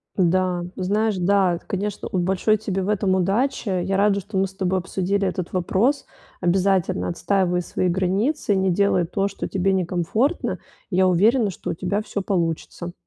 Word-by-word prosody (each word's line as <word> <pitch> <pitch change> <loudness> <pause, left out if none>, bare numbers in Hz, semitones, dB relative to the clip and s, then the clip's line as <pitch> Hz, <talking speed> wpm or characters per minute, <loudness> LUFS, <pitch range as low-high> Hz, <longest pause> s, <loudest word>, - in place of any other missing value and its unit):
Да, 180 -1 +1
ну, 185 - -4
знаешь, 210 +2 +1
да, 185 0 +3
это, - - -11
конечно, 200 +1 -3
вот 185 - 0
большой 190 +4 +2
тебе 195 -2 -3
в 190 - -2
этом 200 -2 +1
удачи. 205 +6 0
Я 195 +1 0
рада, 200 0 +3
что 200 +1 -6
мы 195 0 +2
с 190 - -15
тобой 190 -1 0
обсудили 195 +2 -1
этот 180 -1 -4
вопрос. 195 +10 +1 0.4
Обязательно 180 - +1
отстаивай 180 - 0
свои 180 - -2
границы, 195 - 0
не 190 -1 +2
делай 185 -2 +2
то, 195 +3 -1
что 200 - -5
тебе 195 +1 0
некомфортно. 190 - 0 0.3
Я 185 -1 +3
уверена, 210 +5 +3
что - - -7
у - - -2
тебя 195 +5 -2
всё 205 -1 -4
получится. 175 -1 -2
190 Hz, 175 wpm, -23 LUFS, 180-200 Hz, 0.4 s, да